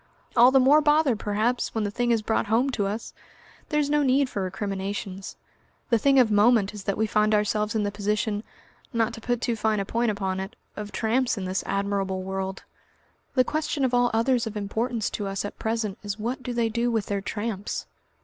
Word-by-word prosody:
"All 245 +1 +8
the 265 0 +5
more 280 +4 +6
bother, 295 -3 +3
perhaps, 220 +4 -1
when 220 - 0
the 205 - -2
thing 240 +3 -1
is 230 -2 +2
brought 220 0 0
home 240 +6 +2
to 205 -5 -1
us. 210 +3 -5 0.6
There's 300 -1 +1
no 295 +1 +2
need 270 0 +3
for 200 - -2
recriminations. 195 +1 -4 0.5
The 230 - +4
thing 275 +3 +4
of 245 -4 +5
moment 210 -1 +4
is 205 -2 -8
that 200 - -1
we 220 - +2
find 215 0 +2
ourselves 210 +1 0
in 215 - +1
the 205 - -1
position 210 +1 -1 0.5
not 230 -2 0
to 225 - -9
put 245 0 -1
too 235 - 0
fine 220 -1 +1
a 195 - -1
point 235 +3 0
upon 190 -3 -2
it 195 +5 -6 0.2
of 210 -1 -6
tramps 235 +4 +1
in 190 - -3
this 185 +1 -1
admirable 195 -1 -1
world. 190 0 -4 0.7
The 255 - +5
question 300 -1 -1
of 250 - -1
all 245 0 +4
others 230 +1 +2
of 215 -1 -5
importance 220 +3 -1
to 205 - -3
us 195 +1 -3
at 205 - -7
present 220 -3 -2
is 205 -1 -4
what 240 +5 -3
do 250 0 -4
they 235 -1 +1
do 235 +2 0
with 225 -4 0
their 200 -1 -2
tramps? 205 0 -4
220 Hz, 210 wpm, -26 LUFS, 205-245 Hz, 0.7 s, All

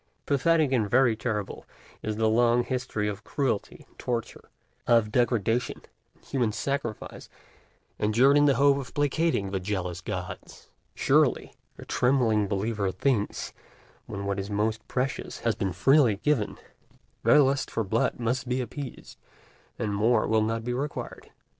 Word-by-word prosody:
Pathetic 155 +1 +2
and 110 -6 +1
very 120 0 +4
terrible 110 -3 -4 0.4
is 110 -1 -3
the 110 +1 +1
long 120 +2 +3
history 125 -5 -2
of 105 0 -5
cruelty 120 -4 -2
and - - -31
torture, 120 -2 -4 0.4
of 115 -3 +3
degradation 120 -1 0 0.3
and - - -28
human 125 -5 0
sacrifice, 125 -1 -4 0.7
endured 120 +7 +4
in 145 0 +5
the 140 -2 +4
hope 140 0 +4
of 135 -3 -7
placating 145 - 0
the 95 - -1
jealous 90 -2 -3
gods: - - -7 0.2
surely, - - +2 0.2
the - - -11
trembling 120 -5 +2
believer 100 0 -1
thinks, 115 -2 -1 0.5
when 100 -1 -5
what 100 0 -1
is 100 +1 -5
most 110 +2 -1
precious 130 +2 -3
has 115 -1 +1
been 95 -3 -2
freely 125 - +4
given, 115 0 0 0.6
their - - +5
lust 135 0 0
for 115 - -1
blood 110 +5 0
must 120 +2 -1
be 125 +1 0
appeased, 130 +2 -7 0.6
and 105 - -2
more 110 +2 +2
will 110 0 +2
not 115 +1 -1
be 120 +1 -2
required. 140 +4 -5
115 Hz, 145 wpm, -27 LUFS, 105-130 Hz, 0.7 s, in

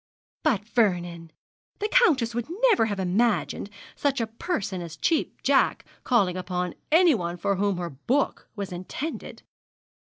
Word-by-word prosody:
'But, 235 -10 +1
Vernon, 175 -8 0 0.5
the 420 - -1
countess 310 - +3
would 240 +1 -3 0.2
never 375 - +4
have 205 -3 -3
imagined 205 +3 0 0.3
such 280 -2 0
a 230 - +1
person 220 - -3
as 170 -1 -7
a - - -29
Cheap 325 - 0
Jack - - +2 0.2
calling 200 -8 +2
upon 180 -1 -3 0.2
anyone 270 - +4
for 195 +2 0
whom 200 -1 +1
her 175 -1 -4
book 245 - -1
was 200 -2 -5
intended.' 185 - -6
205 Hz, 140 wpm, -26 LUFS, 180-260 Hz, 0.5 s, never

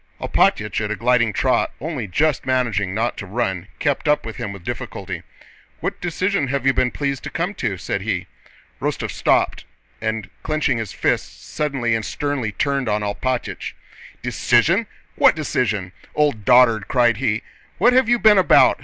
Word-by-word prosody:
Alpátych - - +1
at 105 - -2
a 110 - -1
gliding 120 -1 +2
trot, 130 +3 +2
only 145 -7 -4
just 150 - +1
managing 115 -7 0
not 115 +2 -1
to 100 - -6
run, 95 -4 -2
kept 145 +2 -1
up 150 -4 +2
with 115 - -6
him 115 -4 -4
with 100 -3 -10
difficulty. - - -5 0.6
"What - - -4
decision 180 -2 0
have 135 0 -2
you 135 - +5
been 130 -1 +2
pleased 140 0 -2
to - - -3
come 175 +4 -2
to?" 95 - -1
said 100 +2 -3
he. 95 -4 -2 0.6
Rostóv - - -2
stopped - - +1 0.4
and, 110 -1 -2
clenching 155 -6 0
his 110 -5 -4
fists, - - -2
suddenly 135 -6 -1
and 110 -1 0
sternly 140 -3 -2
turned 135 +3 -1
on 105 0 0
Alpátych. 120 +5 -3 0.5
"Decision? 170 - +2 0.3
What - - +6
decision? 110 - -1 0.2
Old 145 -9 +1
dotard!..." 120 -5 +5
cried 120 -3 +3
he. 115 -3 0 0.3
"What 245 - +4
have 255 -2 +4
you 240 - +5
been 215 -3 +6
about? 185 - +5
125 Hz, 165 wpm, -21 LUFS, 110-145 Hz, 0.6 s, What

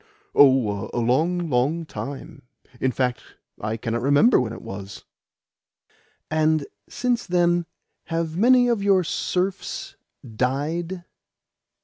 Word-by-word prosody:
"Oh, 125 -8 +4
a - - -2
long, 160 +9 +1
long 145 +5 0
time. 140 -2 -7 0.4
In 130 - +1
fact, 125 -2 -1 0.4
I 110 +1 -3
cannot 115 +1 -3
remember 145 - +4
when 115 -3 -3
it 115 - -9
was." 95 0 -8 1.3
"And 155 -1 +2 0.2
since 245 -1 -1
then 175 -1 +2 0.4
have 165 -1 -2
many 245 +5 +5
of 235 -4 +1
your 195 -2 +3
serfs 180 +3 -3 0.3
died?" 150 +10 -2
155 Hz, 110 wpm, -23 LUFS, 125-175 Hz, 1.3 s, many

